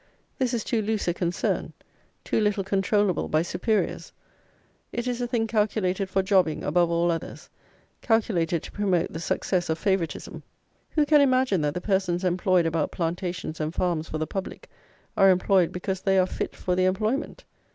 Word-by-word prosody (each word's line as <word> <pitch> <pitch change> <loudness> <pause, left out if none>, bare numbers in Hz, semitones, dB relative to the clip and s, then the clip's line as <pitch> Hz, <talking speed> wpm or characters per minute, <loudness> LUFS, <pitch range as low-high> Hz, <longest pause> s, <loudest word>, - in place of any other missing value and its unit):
This 250 -2 +1
is 225 - -2
too 230 - 0
loose 215 -1 -2
a 175 - +2
concern; 175 0 -2 0.5
too - - 0
little 210 -2 +1
controllable 195 0 +1
by 155 +1 +1
superiors. 200 +5 -1 0.8
It 240 0 -3
is 250 -1 -2
a 245 - -1
thing 235 -2 0
calculated 205 -3 0
for 190 0 +1
jobbing, 185 -5 +2
above 170 +3 +2
all 170 +1 +2
others; 165 - -6 0.5
calculated 180 -8 +1
to - - -9
promote 190 -5 0
the 160 - -4
success 175 +1 -1
of 160 - 0
favouritism. 190 -4 -2 0.5
Who 305 -2 +4
can 295 0 +5
imagine 255 - +3
that 150 -1 -1
the 180 - -3
persons 190 -2 0
employed 180 -1 +2
about 165 -2 0
plantations 175 -1 -3
and 155 +2 -3
farms 170 -3 -1
for 155 - -3
the 155 - -1
public, 195 +3 -6 0.4
are 195 - +6
employed 185 -1 +3
because 185 +1 -3
they 195 0 +2
are 185 - +5
fit - - -4
for 180 - -1
the 185 0 +2
employment? 215 +9 -1
185 Hz, 170 wpm, -26 LUFS, 175-210 Hz, 0.8 s, are